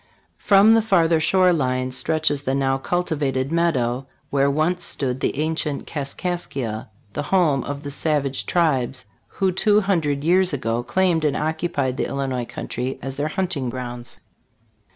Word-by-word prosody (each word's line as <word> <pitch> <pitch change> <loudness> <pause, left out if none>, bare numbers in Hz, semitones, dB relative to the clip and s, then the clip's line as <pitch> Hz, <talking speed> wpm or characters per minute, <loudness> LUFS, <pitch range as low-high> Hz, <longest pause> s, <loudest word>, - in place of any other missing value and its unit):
From 205 +2 +6
the 225 - +5
farther 170 -7 +3
shore 180 +3 +4
line 130 -4 0
stretches 150 +1 +1
the 135 -2 -1
now 135 -1 +1
cultivated 145 -5 -1
meadow, 135 -7 0 0.2
where 140 0 +3
once 160 +5 0
stood 130 -2 -2
the 135 - -1
ancient 155 -1 -1
Kaskaskia, 140 -7 -4 0.2
the - - -2
home 150 -4 +2
of 145 +1 -5
the 145 - -5
savage 140 -2 0
tribes 135 -7 +1 0.2
who 190 -2 0
two 210 +3 +3
hundred 155 -8 0
years 180 +1 +3
ago 115 -3 -1
claimed 170 +5 +1
and 150 -2 +1
occupied 155 -4 -1
the - - -1
Illinois 135 -3 -2
country 125 +2 -4
as 135 - -4
their 145 +3 -2
hunt 185 +3 -1
ing 130 -3 -2
grounds. 120 -1 -6
145 Hz, 155 wpm, -22 LUFS, 135-170 Hz, 0.2 s, From